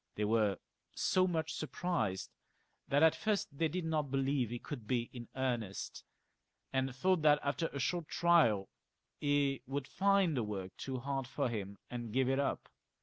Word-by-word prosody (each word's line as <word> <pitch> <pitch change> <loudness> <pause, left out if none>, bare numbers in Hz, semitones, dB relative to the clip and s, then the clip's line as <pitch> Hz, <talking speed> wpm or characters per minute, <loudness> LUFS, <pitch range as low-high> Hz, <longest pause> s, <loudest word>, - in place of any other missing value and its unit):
They 105 - 0
were 105 -2 +2 0.4
so 185 0 +3
much 160 -2 -1
surprised 145 - -2 0.6
that 145 +2 +3
at 160 - +6
first 205 -9 -1
they 160 +3 +2
did 170 +2 -3
not 155 -3 0
believe 135 -2 +1
he 120 - -3
could 120 -3 -7
be 120 -1 0
in 120 -2 -7
earnest, 120 -7 -2 0.7
and 130 -1 0
thought 185 +6 +2
that 150 -1 +6
after 145 +4 0
a 140 - -7
short 165 +4 -1
trial 155 - +4 0.5
he 145 -2 +2
would 135 0 -2
find 195 -3 +3
the 125 - +1
work 95 -3 -4
too 130 -1 -4
hard 135 0 -2
for 135 0 -1
him, 100 -3 -4
and 120 -2 -4
give 130 +2 +2
it 135 +1 +2
up. 140 - -1
135 Hz, 170 wpm, -34 LUFS, 120-160 Hz, 0.7 s, at